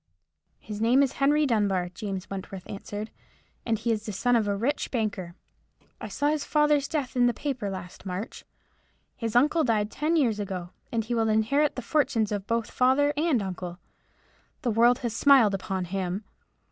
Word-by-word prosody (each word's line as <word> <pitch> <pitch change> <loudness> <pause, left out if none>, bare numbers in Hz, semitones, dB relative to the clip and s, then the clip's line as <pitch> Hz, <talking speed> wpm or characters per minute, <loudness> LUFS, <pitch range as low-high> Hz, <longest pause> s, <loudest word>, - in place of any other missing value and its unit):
"His 210 0 -7
name 250 +5 +5
is 270 - 0
Henry 295 +2 +4
Dunbar," 200 -7 +1
James 195 -1 -5
Wentworth 190 -1 -7
answered, 205 +2 -6 0.6
"and 225 -1 +2
he 230 +2 -1
is 220 -1 -2
the - - -2
son 245 +5 +1
of 220 -3 +2
a 200 - +1
rich 270 +8 -1
banker. 205 -7 -3 0.6
I - - -6
saw 290 - 0
his 300 -1 0
father's 300 -2 +2
death 285 -6 -3
in 245 -1 +4
the 240 - 0
paper 260 -8 -3
last 185 -2 -8
March. 190 +3 -5 0.7
His 230 -2 -4
uncle 300 +6 +4
died 215 -4 +1
ten 310 +3 0
years 235 -9 +2
ago, 185 -3 -4 0.2
and 230 -1 0
he 240 - -3
will 225 -1 +1
inherit 250 +8 +2
the 255 - -5
fortunes 230 -6 +1
of 205 -1 -3
both 230 -1 -1
father 270 +3 +3
and 295 -7 +1
uncle. 180 -2 -5 0.9
The 245 - +1
world 235 +3 +5
has 230 -2 -2
smiled 260 -8 +5
upon 190 -1 -2
him. 190 +2 -3
225 Hz, 180 wpm, -27 LUFS, 200-270 Hz, 0.9 s, name